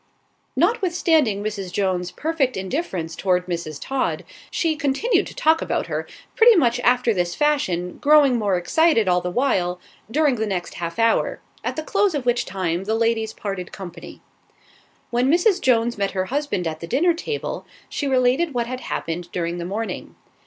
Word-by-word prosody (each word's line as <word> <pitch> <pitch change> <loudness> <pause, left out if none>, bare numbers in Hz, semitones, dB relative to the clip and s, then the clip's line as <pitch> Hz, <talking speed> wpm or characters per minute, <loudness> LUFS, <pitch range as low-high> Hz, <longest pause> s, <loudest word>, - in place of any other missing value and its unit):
Notwithstanding 330 - +2
Mrs. 200 -4 -4
Jones's 185 -2 0
perfect 300 -7 -1
indifference 185 - -3
toward 180 0 +1
Mrs. 170 -4 -4
Todd, 270 -1 -2 0.2
she 325 -2 0
continued 300 - +1
to - - -10
talk 320 +1 +3
about - - -1
her, - - -4 0.3
pretty 470 -1 +7
much 245 -8 +3
after 245 -1 +3
this 175 -2 -1
fashion, 185 -13 0
growing 290 -3 +5
more 200 -4 +1
excited 230 - +3
all 180 -1 +3
the 180 - -3
while, 180 -6 0 0.3
during 290 0 +2
the 220 0 -1
next 180 -4 -3
half 170 +2 -5
hour, 230 0 +2 0.2
at - - -2
the 315 - -3
close 400 0 +1
of 275 -4 -3
which 240 0 +1
time 185 -1 -2
the 220 +2 0
ladies 225 -1 +1
parted 195 -5 -5
company. 185 -3 -10 0.9
When 245 +2 +2
Mrs. 360 +3 +3
Jones 235 -3 +2
met 200 -1 0
her 185 - +1
husband 285 -11 -1
at 160 -1 -3
the 170 - -7
dinner 335 - +3
table, 440 +7 -4 0.2
she 285 - -3
related 260 +4 +2
what 240 -1 +1
had 255 +1 -5
happened 170 +1 -4
during 170 0 -2
the 170 - -4
morning. 215 +5 -4
230 Hz, 170 wpm, -22 LUFS, 180-295 Hz, 0.9 s, pretty